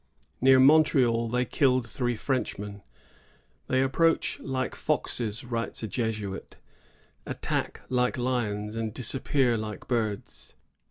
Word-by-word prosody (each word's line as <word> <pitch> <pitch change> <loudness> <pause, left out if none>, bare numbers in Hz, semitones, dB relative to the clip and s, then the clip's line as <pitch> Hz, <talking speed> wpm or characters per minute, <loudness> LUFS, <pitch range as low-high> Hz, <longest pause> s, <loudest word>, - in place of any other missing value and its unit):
Near 130 0 +7
Montreal 130 -5 +5
they 125 +2 +1
killed 130 -4 +2
three 120 +2 -1
Frenchmen. 105 -5 -3 0.9
"They 130 0 +2
approach 165 +5 +1
like 130 -1 -2
foxes," 115 -2 -1
writes 115 -2 -4
a - - -1
Jesuit, 105 -4 -4 0.7
"attack - - -2
like 125 0 +1
lions, 110 -4 -1
and 115 -1 -3
disappear 130 0 +1
like 105 -2 -6
birds." 110 -5 -3
120 Hz, 110 wpm, -27 LUFS, 110-130 Hz, 0.9 s, Near